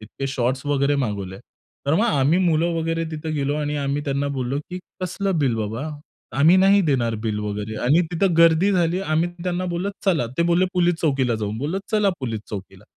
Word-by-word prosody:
इतके 110 +6 -6
शॉर्ट्स 130 +1 -1
वगैरे 145 0 +2
मागवले. 100 -7 -3 0.5
तर 145 - +3
मग 215 +7 +3
आम्ही 150 - +3
मुले 170 -2 +2
वगैरे 165 0 -1
तिथे 155 0 -5
गेलो 145 0 0
आणि 150 0 -2
आम्ही 140 +1 -1
त्यांना 140 0 -1
बोललो, 130 +2 -2
की 180 - -4 0.2
"कसलं 185 0 -1
बिल 130 -5 +2
बाबा? 110 +7 -3 0.5
आम्ही 165 +6 +6
नाही 195 +2 +5
देणार 125 -8 +1
बिल 105 -1 -1
वगैरे" 105 +1 -4
आणि 150 +7 +4
तिथं 175 -1 +1
गर्दी 165 +4 +5
झाली 175 0 +1
आम्ही 165 -1 0 0.2
त्यांना 180 0 -1
बोललो, 185 +4 -2
"चला." 165 -11 +2
ते - - +4
बोलले, 175 +2 +4
"पोलिस 175 -1 +3
चौकीला 135 -6 +1
जाऊ." 105 -2 -3
बोललो 155 +8 -2
"चला 210 -2 +3
पोलिस 115 -4 -3
चौकीला." 100 -2 -8
150 Hz, 190 wpm, -22 LUFS, 125-175 Hz, 0.5 s, आम्ही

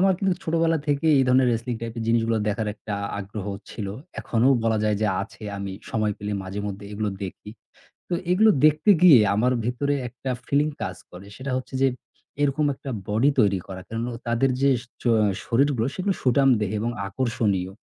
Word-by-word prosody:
আমার 190 0 +5
কিন্তু 195 -2 +1
ছোটবেলা 165 0 +2
থেকেই 145 +2 +3
এই 135 - +4
ধরনের 130 0 +4
wrestling 115 0 -2
type 115 0 -6
এর - - -2
জিনিসগুলা 115 -1 +2
দেখার 110 +1 -1
একটা 105 -1 -6 0.2
আগ্রহ 100 0 -6 0.2
ছিল। 105 -3 -5 0.3
এখনো 120 +2 +2 0.2
বলা 110 -1 +2
যায় 105 -1 +2
যে - - +3 0.2
আছে। 110 - -12 0.2
আমি 100 -1 -4 0.2
সময় 110 -2 0
পেলে 105 0 -4
মাঝেমধ্যে 100 +1 -5
এগুলো 105 0 -2 0.2
দেখি। 95 +2 -8 0.6
তো - - -1 0.2
এগুলো 215 +5 +5 0.2
দেখতে 155 +7 +3
গিয়ে 155 -10 +9 0.2
আমার 125 +4 +2
ভেতরে 140 +4 0
একটা 130 +2 -7 0.2
feeling 150 +2 +1
কাজ 95 - -4 0.2
করে। 90 +2 -11
সেটা 130 0 -5
হচ্ছে 130 - -8
যে, 135 - +5 0.5
এরকম 145 +1 +2
একটা 135 - -8 0.2
body 115 +7 +3
তৈরি 100 -3 +3
করা। 95 -1 -7
কারণ 115 +1 -4
অ - - -5
তাদের 120 +3 +2
যে 140 - +5 0.4
অ - - +5 0.3
শরীরগুলো 125 -1 +2
সেগুলো 195 +1 0
সুঠামদেহ 125 -5 +3
এবং 115 +2 -1 0.2
আকর্ষণীয়। 100 -4 -1
115 Hz, 180 wpm, -24 LUFS, 105-140 Hz, 0.6 s, গিয়ে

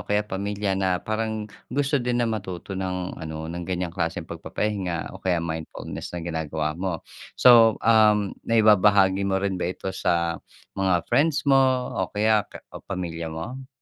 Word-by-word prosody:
kaya 105 0 +2
pamilya 100 0 -2
na 95 -1 +1
parang 110 0 -2 0.2
gusto 140 +2 +1
din 120 0 -1
na 120 - +2
matuto 95 -5 -4
ng 90 -1 -3
ano 80 -1 -6
ng 85 +2 -5
ganyang 90 -2 -2
klaseng 80 -1 -2
pagpapahinga 95 -6 -3
o - - -11
kaya 90 -2 +1
mindfulness 80 0 -5
na 85 - -5
ginagawa 80 -2 -2
mo. 85 0 -4 0.3
So, 115 -3 +7
um, 105 -3 +4 0.2
naibabahagi 105 -3 +5
mo 95 - +1
rin 95 -2 -1
ba - - 0
ito 95 +1 -5
sa 85 -2 0 0.3
mga 95 -3 +1
friends 150 +1 +2
mo 135 -1 +5 0.3
o 95 - -1
kaya 110 +1 +2
ka - - -12
o - - -8
pamilya 85 -4 -5
mo? 120 +12 -7
95 Hz, 160 wpm, -24 LUFS, 85-110 Hz, 0.3 s, So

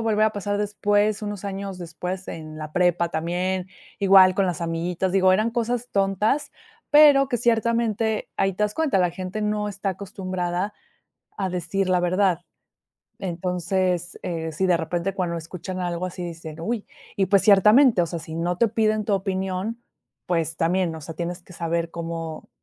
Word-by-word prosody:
volver 215 -1 +3
a 215 - 0
pasar 205 0 -2
después, 205 +1 +1
unos 205 -1 -4
años 195 -1 -5
después 180 +2 -5
en 155 -1 -7
la 155 -1 -6
prepa, 175 0 +2
también 180 +3 -2 0.3
igual 190 -2 +7
con 195 - +2
las 175 -3 -2
amiguitas, 170 +2 -1
digo, 185 0 +4
eran 215 +5 +2
cosas 240 +1 -1
tontas, 200 +8 +1 0.4
pero 290 -2 +7
que 240 - +1
ciertamente 230 -1 +1
ahí 195 0 +1
te 200 +3 -3
das 210 0 0
cuenta, 305 -11 +1
la 180 - +3
gente 185 +4 -5
no 210 0 -1
está 200 0 -4
acostumbrada 185 0 -3 0.6
a 190 -2 -1
decir 185 +2 -1
la 180 -1 +3
verdad. 180 0 +2 0.8
Entonces, 180 0 -1
eh, 165 -2 -3
sí, 190 +5 0
de 180 - +4
repente, 170 +3 -2
cuando 175 -2 -1
escuchan 180 +3 -6
algo 175 0 -2
así, 180 0 -7
dicen: 165 -2 -8
"¡Uy!", 220 +4 -3 0.3
y 195 - +2
pues, 195 +1 +4
ciertamente, 210 +2 +6
o - - 0
sea, 165 0 -5
si 160 0 -7
no 175 +1 -1
te 230 +4 +3
piden 215 0 +1
tu 205 - +1
opinión, 190 +4 -2 0.4
pues, 165 -2 0
también, 170 0 +1
o 160 - -7
sea, 160 +2 -8
tienes 175 +1 -4
que 180 - -15
saber 170 0 -2
cómo 165 -1 -6
185 Hz, 170 wpm, -24 LUFS, 175-205 Hz, 0.8 s, igual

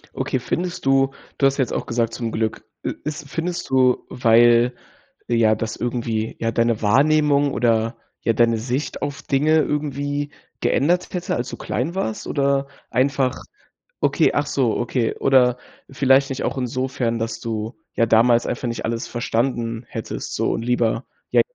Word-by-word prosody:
Okay, - - -1
findest 170 +8 -3
du 135 0 +3 0.3
du 140 - +4
hast 135 - -1
jetzt 130 -3 0
auch - - -3
gesagt 115 -1 0
zum 115 -2 -3
Glück, 110 0 -2 0.2
äh, - - -2
ist 150 -1 -5
findest 170 +4 -3
du, 130 -1 +3
weil, 120 0 +4 0.5
ja, 115 -2 +3
das 115 -1 -4
irgendwie, 115 -2 -2
ja, 115 0 0
deine 115 -1 +1
Wahrnehmung 145 +5 +3
oder, 115 -1 +1 0.2
ja, 115 - +1
deine 115 0 +3
Sicht 130 +5 -3
auf 145 -1 -4
Dinge 155 +3 +3
irgendwie 145 0 -2 0.3
geändert 175 +5 +1
hätte, 180 -1 -2
als 120 - -3
du - - -7
klein 155 +9 -3
warst 110 - -3
oder 140 -1 +1 0.2
einfach 130 0 +1 0.6
okay, - - +3
ach 145 0 0
so, 125 -6 +1
okay. 120 -1 -1
Oder 125 -2 +4 0.3
vielleicht 135 0 +3
nicht 135 - -3
auch 135 - -2
insofern, 125 -2 -1
dass 115 0 -3
du 110 +1 -4 0.2
ja 115 - +3
damals 115 +2 +4
einfach 120 0 -2
nicht 115 - -3
alles 115 +2 -2
verstanden 115 -1 -2
hättest 115 - -5
so - - +1
und - - -2
lieber, 120 0 0 0.3
ja - - +6
125 Hz, 160 wpm, -22 LUFS, 115-140 Hz, 0.6 s, ja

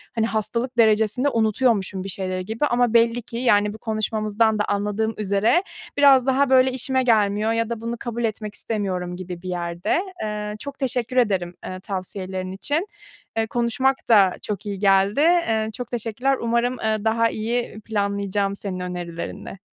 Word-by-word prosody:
hani, 225 -1 +2
hastalık 235 +3 -2
derecesinde 220 +3 +3
unutuyormuşum 220 -5 +1
bir 195 - -6
şeyleri 185 -1 -3
gibi 225 +8 -1
ama 245 -4 +2
belli 230 +1 +4
ki, 230 0 -8
yani, 210 -4 +3
bu - - -9
konuşmamızdan 215 0 0
da - - +3
anladığım 210 +2 -1
üzere 210 - +2 0.3
biraz 275 -3 +6
daha, 265 +1 +2
böyle, 260 0 +5
işime 260 +1 0
gelmiyor 215 -2 +2
ya 230 0 0
da 230 -2 -4
bunu 230 +1 -3
kabul 235 0 -4
etmek 215 -1 -3
istemiyorum 185 -5 -3
gibi 180 -1 -7
bir 185 - -6
yerde. 175 - -1 0.2
Eee, 210 -1 -3
çok 280 +1 -8
teşekkür 250 -2 -1
ederim, 190 -7 +1
eee, 185 - -6
tavsiyelerin 185 -1 -5
için. 290 - -2 0.5
Eee, 225 0 +1
konuşmak 240 +3 +1
da 200 -5 +6
çok 210 0 -4
iyi 200 -2 -4
geldi. 195 +3 +3
Eee, 305 -10 +3
çok 245 -2 -6
teşekkürler. 240 +3 0
Umarım, 235 +2 0
eee, 220 0 +1
daha 230 +1 +2
iyi 230 0 -3
planlayacağım 200 -1 -1
senin 195 -2 -5
önerilerinle. 180 +1 -6
220 Hz, 160 wpm, -23 LUFS, 200-240 Hz, 0.5 s, biraz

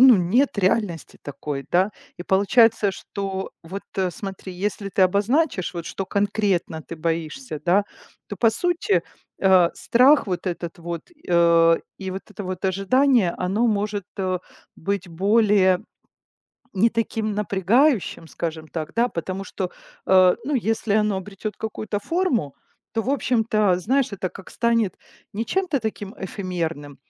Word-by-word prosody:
Ну, 255 -3 +9
нет 205 +8 +2
реальности 190 -3 0
такой, 140 0 -5
да? 185 +4 +3 0.3
И - - -4
получается, 205 +2 +4
что 195 0 -5
вот, 190 +4 -6
э, 190 -2 +1
смотри, 190 +2 -7
если 205 -1 -2
ты 190 - +2
обозначишь, 205 - +1
вот 170 -1 -4
что 195 - -4
конкретно 200 -4 0
ты - - -8
боишься, 165 - -3
да, 195 +4 +4 0.4
то 205 - -6
по 225 +4 +4
сути, 350 - +1 0.4
э, 185 -3 +5
страх 260 +4 +4
вот 180 0 -3
этот 170 -2 -4
вот, 170 -1 -5 0.3
э, 170 -1 +5 0.2
и 190 -1 -4
вот 190 - -5
это 200 - -6
вот 185 +1 -5
ожидание, 195 +2 +3
оно 195 +6 +1
может, 205 -2 -1
э, 185 -1 0 0.4
быть 200 +2 -3
более 195 +1 +3 1.0
не 205 +4 +4
таким 220 -1 -1
напрягающим, 210 - +2
скажем 160 -1 -5
так, 155 -2 -5
да? 235 +1 +3
Потому 185 0 -4
что, 185 -1 -4 0.4
э, 185 -1 +6
ну, 290 +3 -1
если 225 -2 0
оно 210 -2 +2
обретет 195 +2 -6
какую-то 215 -1 -4
форму, 260 - 0 0.4
то 225 - 0
в 235 - -5
общем-то, 220 -8 +2
знаешь, 260 +8 +1
это 190 -2 -3
как 195 - -12
станет 230 -4 +1 0.4
не 220 +3 -2
чем-то 370 -7 0
таким 210 -4 -5
эфемерным, 170 -7 -4
195 Hz, 145 wpm, -23 LUFS, 180-225 Hz, 1.0 s, Ну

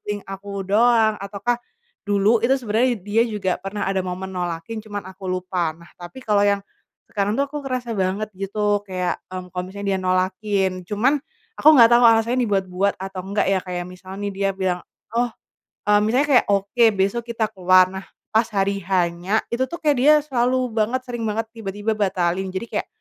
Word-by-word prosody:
feeling 205 -1 -4
aku 195 0 -6
doang, 220 +1 +3
ataukah, 205 +5 -2 0.4
dulu 205 +3 +2
itu 260 +3 +4
sebenarnya 235 +1 +1
dia 210 +4 +1
juga 210 -6 -1
pernah 195 0 -3
ada 195 0 0
momen 185 +1 -5
nolakin, 175 +5 -4
cuman 205 -3 -6
aku 190 0 -10
lupa. 185 -2 -1
Nah 170 +1 -17
tapi 175 +8 -10
kalo 210 -5 +1
yang, 200 0 +3 0.5
sekarang 205 +1 -1
tuh 280 - +3
aku 295 0 -6
kerasa 255 -3 -3
banget 195 +2 -1
gitu, 205 +1 -1
kayak, 185 -2 -3
mmm, 185 -1 -7
kalo 180 - -2
misalnya 200 +1 -6
dia 190 - -1
nolakin. 190 +2 +1 0.2
Cuman, 255 +8 +2 0.3
aku 305 - +4
nggak 230 -2 +8
tau 240 +1 +6
alasannya 230 +3 +3
dibuat-buat 195 -1 0
atau 190 0 -6
enggak 200 +2 -1
ya, 190 - +3
kayak 180 -1 -4
misalnya 185 +1 -10
nih 200 - -3
dia 195 0 0
bilang, 185 -2 -1 0.3
"oh" 240 0 +1 0.6
eee, 210 0 +5
misalnya 250 +7 +2
kayak 270 -4 +4
"oke 200 +4 +2
besok 200 +5 +1
kita 225 -2 0
keluar". 185 0 +5
Nah, 190 0 -6 0.3
pas 225 +1 +3
hari 200 -1 0
H-nya, 180 +2 0
itu 245 +2 0
tuh 340 - -5
kayak 295 -3 +2
dia 295 +4 +6
selalu 255 -2 0
banget, 230 +4 +1
sering 240 -1 -5
banget, 220 +1 -1
tiba-tiba 205 0 -3
batalin. 190 -2 0
Jadi 190 +5 -4
kayak, - - -1
200 Hz, 185 wpm, -22 LUFS, 190-230 Hz, 0.6 s, nggak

